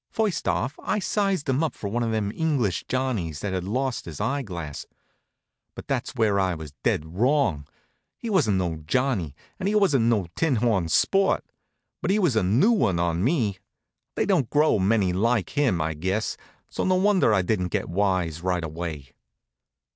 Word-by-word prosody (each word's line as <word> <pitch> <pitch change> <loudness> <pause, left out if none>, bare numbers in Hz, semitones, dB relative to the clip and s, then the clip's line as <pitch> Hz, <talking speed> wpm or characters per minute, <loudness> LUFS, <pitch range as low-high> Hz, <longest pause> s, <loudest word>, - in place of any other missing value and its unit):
First 215 -4 -1
off 135 +5 -1
I - - -1
sized 195 -4 0
him 135 +4 +1
up 160 - -2
for 100 - -5
one 115 +4 -1
of 115 - 0
them 110 -2 -1
English 135 - 0
Johnnies 110 - -2
that 100 -2 -3
had 90 -1 -2
lost 130 +5 -2
his 80 -4 -8
eyeglass. 90 - -3 0.9
But - - -9
that's 130 -1 -2
where 110 -4 +2
I 95 -2 +1
was 80 -3 -9
dead 75 - +1
wrong. 120 - +2 0.5
He 235 - -7
wasn't 145 - +2
no 85 -3 -1
Johnnie, 85 - -1 0.2
and 190 - -1
he 210 - 0
wasn't 155 - +3
no 110 -5 +2
tinhorn 115 - +1
sport. 195 - +2 0.6
But - - -2
he 200 - +3
was 175 - +2
a 110 - +3
new 115 - +3
one 115 - +2
on 85 +1 0
me. 115 - +1 0.6
They - - +1
don't 170 - +1
grow 150 -6 +3
many 95 -1 +2
like 115 +2 +1
him, 135 - +1
I 80 0 -1
guess, 95 +8 -2 0.3
so - - -3
no 185 - +2
wonder 190 - +3
I 95 -3 +3
didn't 90 -1 0
get 85 - -2
wise 90 -3 0
right 90 -1 -1
away. 80 -4 -6
110 Hz, 175 wpm, -25 LUFS, 90-140 Hz, 0.9 s, wasn't